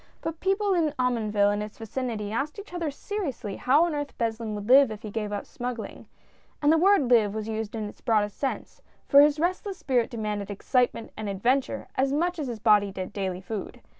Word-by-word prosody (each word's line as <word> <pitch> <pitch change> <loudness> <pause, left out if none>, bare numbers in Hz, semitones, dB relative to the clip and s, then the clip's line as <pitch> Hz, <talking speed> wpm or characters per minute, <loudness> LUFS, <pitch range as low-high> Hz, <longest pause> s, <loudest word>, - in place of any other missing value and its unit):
But 325 0 -4
people 390 +1 +1
in 315 -4 +1
Omonville 215 -5 +2
and 205 0 -1
its 210 0 -7
vicinity 225 -2 -4
asked 275 - -2
each 405 -3 -10
other 340 -3 -2
seriously 280 - -4
how 285 +6 +4
on 340 - -2
earth 290 -1 -4
Beslin 225 -2 -2
would 205 0 -6
live 270 +1 +7
if 215 -1 -8
he 215 - -6
gave 210 -1 -3
up 205 -1 -3
smug 245 0 -5
gling 220 - -8 0.3
— - - -35
and 295 - +5
the - - +4
word 360 -8 +4
live 215 -4 +4
was 215 0 -3
used 220 0 -4
in 215 -2 -3
its - - -12
broadest 210 -3 +1
THE 275 - +3
SMUGGLER. - - -1
39 - - -21
sense, - - -28 0.3
for 280 - +8
his 295 +1 +4
restless 370 +3 -1
spirit 250 -8 +1
demanded 210 -3 -3
excitement 235 +3 0
and 215 -1 -4
adventure 245 +8 0
as 270 +1 +1
much 345 +4 0
as 290 - -2
his 235 -2 -4
body 210 -2 +4
did 185 -1 -5
his - - -24
daily 190 -2 -3
food. 210 +1 -6
235 Hz, 230 wpm, -26 LUFS, 210-290 Hz, 0.3 s, for